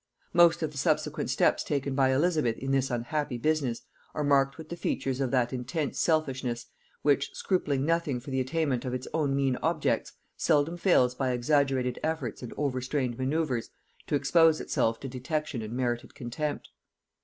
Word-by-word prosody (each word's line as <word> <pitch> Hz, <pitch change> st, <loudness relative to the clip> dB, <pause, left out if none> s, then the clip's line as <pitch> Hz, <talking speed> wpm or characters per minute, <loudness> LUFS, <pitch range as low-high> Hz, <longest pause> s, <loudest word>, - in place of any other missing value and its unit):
Most 170 Hz, -1 st, +5 dB
of 155 Hz, -, -1 dB
the 140 Hz, -, -6 dB
subsequent -, -, 0 dB
steps -, -, +2 dB
taken 140 Hz, -1 st, -1 dB
by 135 Hz, -1 st, +3 dB
Elizabeth 150 Hz, -4 st, +2 dB
in 135 Hz, 0 st, -3 dB
this 135 Hz, -1 st, +2 dB
unhappy 125 Hz, +2 st, -2 dB
business 140 Hz, -3 st, 0 dB, 0.3 s
are 150 Hz, -, -1 dB
marked 135 Hz, -1 st, +3 dB
with 160 Hz, -1 st, -10 dB
the 170 Hz, -, -4 dB
features 135 Hz, -5 st, -2 dB
of 135 Hz, -, +1 dB
that 125 Hz, -1 st, +1 dB
intense 130 Hz, +4 st, -3 dB
selfishness 130 Hz, -7 st, 0 dB, 0.4 s
which, 145 Hz, -1 st, +3 dB
scrupling 145 Hz, -8 st, 0 dB
nothing 165 Hz, -5 st, 0 dB
for 135 Hz, +3 st, -9 dB
the 130 Hz, -, 0 dB
attainment 130 Hz, -1 st, 0 dB
of 125 Hz, -1 st, -2 dB
its 130 Hz, -, -5 dB
own 145 Hz, -4 st, +1 dB
mean 135 Hz, -2 st, +1 dB
objects, -, -, 0 dB, 0.2 s
seldom 150 Hz, +3 st, +2 dB
fails 170 Hz, -9 st, +3 dB
by 130 Hz, 0 st, -1 dB
exaggerated 130 Hz, -1 st, +1 dB
efforts 155 Hz, -8 st, -2 dB
and 125 Hz, -, -7 dB
overstrained 130 Hz, -2 st, -1 dB
manoeuvres 130 Hz, -3 st, -1 dB, 0.4 s
to -, -, +1 dB
expose 160 Hz, +3 st, +4 dB
itself 115 Hz, 0 st, 0 dB
to 135 Hz, -, -5 dB
detection 135 Hz, +1 st, -3 dB
and 110 Hz, +1 st, -6 dB
merited 120 Hz, -1 st, -2 dB
contempt. 135 Hz, +5 st, -4 dB
135 Hz, 165 wpm, -28 LUFS, 125-155 Hz, 0.4 s, Most